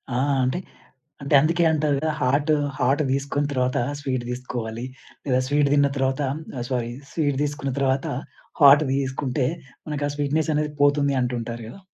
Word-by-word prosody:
ఆ! - - +1 0.3
అంటే 130 +8 0 0.6
అంటే 140 +2 -2
అందుకే 165 +4 +2
అంటారు 150 -2 +1
గదా! 155 +3 0
హాట్ 145 +4 +2 0.3
హాట్ 135 +4 +2
తీసుకున్న 140 +1 -1
తర్వాత 130 0 0 0.2
స్వీట్ 130 -3 -2
తీసుకోవాలి. 120 -2 -5 0.4
లేదా 130 -2 +2
స్వీట్ 145 0 +2
తిన్న 145 -1 +4
తర్వాత 135 +1 0 0.4
ఆహ్, 120 - -3
సారీ 120 -3 -1 0.2
స్వీట్ 145 -4 0
తీసుకున్న 145 -2 -2
తర్వాత 135 0 +1 0.6
హాట్ 145 +1 +8
తీసుకుంటే 135 0 -1 0.4
మనకి 150 -1 -2
ఆ - - -2
స్వీట్‌నెస్ 150 +2 0
అనేది 150 0 0
పోతుంది 145 0 +3
అంటుంటారు 120 -1 -3
గదా! 190 +12 -11
140 Hz, 150 wpm, -24 LUFS, 130-145 Hz, 0.6 s, హాట్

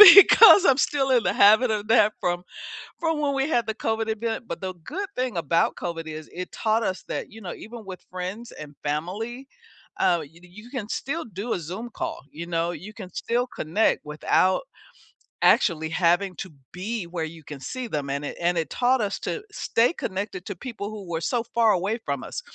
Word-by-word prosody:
Because 405 0 +11
I'm 275 -6 +5
still 275 -1 +1
in 245 -3 +4
the - - +2
habit 220 +4 +6
of 210 -1 -2
that 215 -2 +5
from 175 0 -1 0.6
from 325 -2 0
when 290 -1 +1
we 270 +2 0
had 240 -6 +1
the 220 - -2
COVID 225 0 -1
event. 225 +1 -2
But 170 - -5
the 185 -1 -4
good 390 - -4
thing 250 -6 -1
about 165 +1 +1
COVID 165 -2 -4
is 155 -1 -7
it 180 +1 -6
taught 220 +1 +1
us 185 - -2
that, - - -4
you 225 - -11
know, 185 -4 -6
even 225 0 -10
with 185 -2 -9
friends 185 +6 -6
and 150 -1 -10
family, 210 - -3 0.5
uh, 175 -2 +3
y 160 +4 -14
you 195 +6 -13
can 235 -6 -4
still 320 +5 -3
do 210 +2 -4
a - - -2
Zoom 185 +9 -6
call. - - -4
You 170 +3 -7
know, 170 0 0
you 200 +4 -8
can 195 -4 -8
still 245 +2 0
connect 190 +5 0
without 155 +5 +2 0.8
actually 160 -4 +4
having 175 +2 +2
to 190 - -6 0.2
be 205 +3 -3
where 170 -2 -3
you 160 0 -8
can 145 -1 -8
see 255 - -5
them. 145 -7 -3
And 140 +1 -2
it - - -5
and 175 +1 +1
it 160 -3 -1
taught 255 +1 +2
us 200 -2 -1
to 445 - -2
stay 240 - +2
connected 190 - -4
to - - -4
people 230 -6 -6
who 215 -2 -7
were 165 -1 -1
so 235 +8 0
far 225 -2 +5
away 200 +6 0
from 140 -3 -2
us, - - -5
205 Hz, 205 wpm, -25 LUFS, 170-235 Hz, 0.8 s, Because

